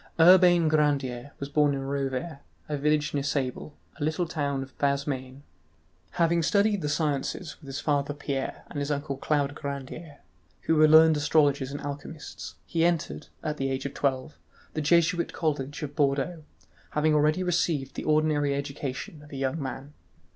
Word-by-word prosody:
Urbain 175 -1 +7
Grandier 145 -4 +1
was 140 - -4
born 145 0 +2
at 135 - -3
Rovere, 140 +2 -3 0.3
a 150 - -2
village 150 +1 +1
near 145 - 0
Sable, 140 0 -2 0.2
a - - -2
little 160 +3 0
town 140 -4 -2
of 135 - -14
Bas 140 -1 +1
Maine. 130 -1 -5 0.7
Having 170 -1 +2
studied 205 +3 +2
the 150 - -2
sciences 150 +1 -1
with 145 - -15
his 135 +1 -4
father 145 -1 0
Pierre 140 -2 -4
and 145 - -4
his 145 0 -2
uncle 145 -1 -2
Claude 145 0 0
Grandier, 145 +2 -7 0.4
who 160 - +1
were 155 0 +6
learned 160 0 +7
astrologers 145 -2 +2
and 145 - -5
alchemists, 140 - -7
he 165 -1 0
entered, 170 -3 0 0.2
at 150 -1 -2
the 135 0 -1
age 135 +1 -3
of 140 - -4
twelve, 135 +1 -2 0.3
the 155 - -2
Jesuit 170 +3 +2
college 145 -2 -2
at 145 -1 -6
Bordeaux, 145 +3 0 0.6
having 155 +1 +3
already 150 +4 +3
received 165 -6 0
the - - -5
ordinary 150 -2 +2
education 140 +1 -5
of 150 - -15
a 140 - -6
young 135 +3 -1
man. 135 +1 -6
145 Hz, 170 wpm, -27 LUFS, 140-155 Hz, 0.7 s, Urbain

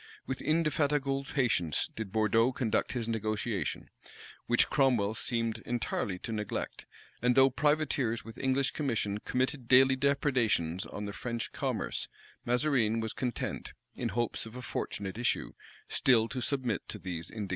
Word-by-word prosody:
With 130 0 -4
indefatigable 145 -3 +1
patience 110 - +1
did 110 -4 -5
Bourdeaux 115 +3 +3
conduct 125 0 0
this 115 -2 -2
negotiation, 110 -1 -2 0.6
which 120 - +4
Cromwell 125 -7 +3
seemed 115 -1 -1
entirely 110 -5 -2
to - - -4
neglect; 105 -2 -4 0.3
and 125 +1 +3
though 135 0 +6
privateers 140 -4 +1
with 115 - -10
English 135 +1 +2
commission 110 -8 -1
committed 130 +2 -1
daily 130 +1 +6
depredations 130 - +1
on 105 - -5
the 100 - -5
French 115 0 -4
commerce, - - -2 0.4
Mazarine 125 -3 +2
was 110 -1 -2
content, 125 -3 -3 0.2
in - - -2
hopes 120 -1 -1
of 110 - -11
a 125 - -7
fortunate 100 -3 -4
issue, 120 - 0 0.3
still 115 -4 +4
to 130 - -3
submit 125 -7 0
to - - -5
these 85 -3 -5
indignities. 105 -3 -5
120 Hz, 145 wpm, -31 LUFS, 110-135 Hz, 0.6 s, though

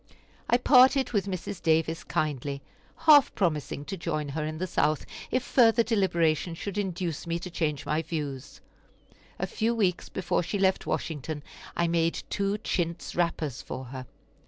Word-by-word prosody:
I 240 - +5
parted 260 +1 +5
with 200 -3 0
Mrs. 185 -1 -5
Davis 160 0 +1
kindly, 140 -2 -2 0.4
half 295 -4 +7
promising 155 -6 -1
to 195 - -4
join 155 -4 -3
her 155 +2 -3
in 155 +1 -4
the 185 - -2
South 155 -4 +1 0.2
if 255 0 0
further 230 -3 +4
deliberation 175 -7 +1
should 200 +4 -4
induce 175 -5 -3
me 170 0 0
to 175 +1 -7
change 155 -4 -2
my 155 +1 0
views. 140 -4 -5 0.8
A - - -1
few 230 +1 -1
weeks 185 -6 0
before 185 -2 0
she 190 +4 -2
left 190 -1 +1
Washington 150 -1 -3 0.3
I 170 - +2
made 165 0 +1
two 200 0 0
chintz 170 -5 -2
wrappers 165 -6 -1
for 130 0 -6
her. 130 -2 -7
170 Hz, 160 wpm, -28 LUFS, 155-200 Hz, 0.8 s, half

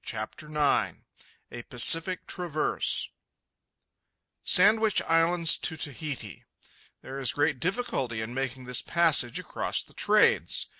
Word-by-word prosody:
CHAPTER 110 +7 -6
IX 150 -2 0 0.5
A 120 - -8
PACIFIC 165 +9 +3
TRAVERSE 165 -4 -1 1.3
Sandwich 215 +3 +3
Islands 165 0 +2
to 160 - -2
Tahiti.—There 135 - -9
is 130 -4 -1
great 145 -2 0
difficulty 160 - -3
in 110 +2 -6
making 130 -1 -5
this 125 -1 +1
passage 160 -8 +2
across - - -3
the - - -19
trades. - - +1
150 Hz, 105 wpm, -27 LUFS, 125-170 Hz, 1.3 s, PACIFIC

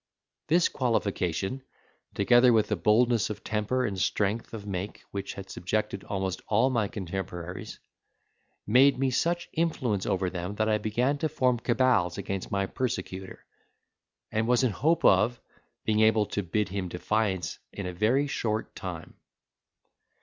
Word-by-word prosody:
This 170 +2 +4
qualification, 100 - -1 0.5
together 120 +5 +5
with 110 -2 +3
the 105 - +1
boldness 110 +4 +3
of 105 - -6
temper 110 +4 0
and 95 -4 -3
strength 105 +5 0
of 110 -3 -7
make 100 0 -5
which 100 -1 -5
had 95 0 -8
subjected 100 +2 -2
almost 95 -2 -3
all 115 +5 +3
my 115 -5 +1
contemporaries, 95 -4 -6 0.9
gave 130 +6 +5
me 135 0 +1
such 170 +6 0
influence 130 - 0
over 95 0 0
them 90 +2 -4
that 110 +1 0
I 110 -1 +2
began 125 +7 0
to 155 - 0
form 125 -5 +1
cabals 120 -9 +2
against 95 -1 -4
my 100 0 0
persecutor; 95 -5 -4 0.9
and 110 +1 0
was 125 +1 +3
in 125 - +3
hope 160 +10 +1
of, 105 +5 +4 0.5
being 110 -1 +2
able 110 -1 +4
to 105 - 0
bid 100 +3 -1
him 95 -1 -3
defiance 95 0 -1
in 100 - -6
a 90 - -4
very 115 +10 +2
short 110 -6 -2
time. - - -7
105 Hz, 150 wpm, -28 LUFS, 95-125 Hz, 0.9 s, together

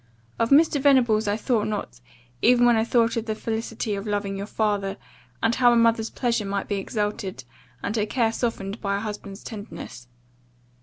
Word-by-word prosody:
Of 230 - +2
Mr. 290 0 +5
Venables 240 -6 +4
I 205 +1 +1
thought 225 -2 0
not, - - -4 0.4
even 245 0 +5
when 240 -1 +5
I 220 - +2
thought 230 0 +2
of 230 0 -3
the 220 - -1
felicity 225 0 -3
of 200 +1 -4
loving 205 -1 -1
your 200 +1 -5
father, 205 -3 -1 0.5
and 225 +1 +3
how 245 0 +5
a - - +4
mother's 230 -1 +3
pleasure 235 -3 -1
might 200 0 -3
be 205 - -1
exalted, 200 - -3 0.4
and 215 - -2
her 215 -1 0
care 230 0 +1
softened 225 -3 -3
by 200 -1 0
a - - -2
husband's 205 -2 -7
tenderness. 205 - -8
220 Hz, 185 wpm, -24 LUFS, 205-230 Hz, 0.5 s, Mr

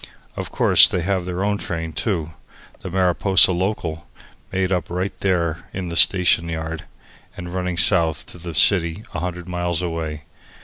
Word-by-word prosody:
Of - - -5
course, - - +6
they 90 - -2
have 90 0 -1
their 90 +1 -3
own 100 0 0
train, 80 -2 -5
too 85 -7 -2 0.5
the - - -7
Mariposa 95 +1 +4
Local, 85 -4 -3 0.4
made 95 0 -1
up 90 -2 -1
right 90 +3 -3
there 85 -4 -1
in 95 -2 -5
the 85 - -5
station 85 -2 +4
yard, 80 0 -5 0.5
and 90 0 -7
running 90 -1 -3
south 80 -3 +2
to 90 - -11
the 85 -1 -7
city 85 +2 +2
a - - -3
hundred 90 +1 -5
miles 90 -1 -2
away. 80 -3 -4
90 Hz, 165 wpm, -21 LUFS, 80-95 Hz, 0.5 s, course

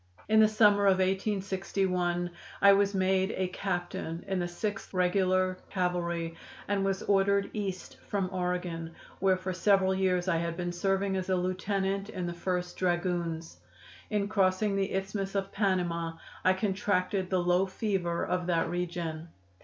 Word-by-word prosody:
In 220 +1 +5
the 215 - +7
summer 210 -2 +4
of 190 -1 +5
1861 190 -2 0 0.3
I 200 0 +8
was 200 0 +2
made 190 +1 +2
a 185 - +1
captain 175 -2 -3
in 190 -1 -1
the 175 - -1
Sixth 195 +2 -4
Regular 185 0 +2
Cavalry, 170 -2 -1 0.3
and 200 -1 +1
was 195 -1 -1
ordered 200 0 +2
East 195 -4 -4
from 195 -2 0
Oregon, 180 -2 -3 0.2
where 190 -1 +3
for 185 0 -4
several 190 0 +3
years 185 -1 +1
I 175 -3 +2
had 170 0 -2
been 175 -1 -2
serving 195 +2 0
as 185 0 -3
a 185 - +3
lieutenant 190 +2 -1
in 180 -4 -4
the 175 - -3
First 180 0 -3
Dragoons. 175 -2 -1 0.5
In 205 -2 0
crossing 200 0 +2
the 195 -1 0
Isthmus 195 +1 -3
of 195 0 -1
Panama 175 -5 0 0.3
I 185 - +5
contracted 190 -1 0
the 185 - +2
low 180 +2 +2
fever 185 -4 -1
of 180 -1 -1
that 165 -1 +1
region. 170 -2 -3
185 Hz, 155 wpm, -30 LUFS, 175-195 Hz, 0.5 s, I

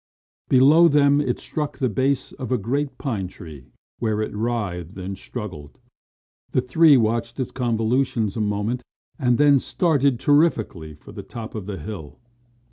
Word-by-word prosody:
Below 145 +6 +6
them 145 -1 +4
it 125 -4 -1
struck 150 -2 -4
the 130 - +1
base 130 +4 0
of 130 -2 -7
a 125 - +3
great 135 +7 -2
pine 110 -10 -3
tree, 80 -7 -12 0.3
where 110 -2 0
it 110 - -3
writhed 105 -6 -3
and 95 +1 -5
struggled. 90 - -8 0.8
The 130 - +3
three 150 +3 +5
watched 115 +2 -1
its 130 - -2
convolutions 115 -2 0
a 110 - -2
moment 105 +4 -1 0.4
and 125 -4 +2
then 145 -1 +5
started 140 -6 +1
terrifically 115 - +1
for 75 - -14
the - - -8
top 115 -2 -8
of 105 -3 -6
the 100 -2 -4
hill. 80 -2 -8
120 Hz, 155 wpm, -23 LUFS, 105-135 Hz, 0.8 s, Below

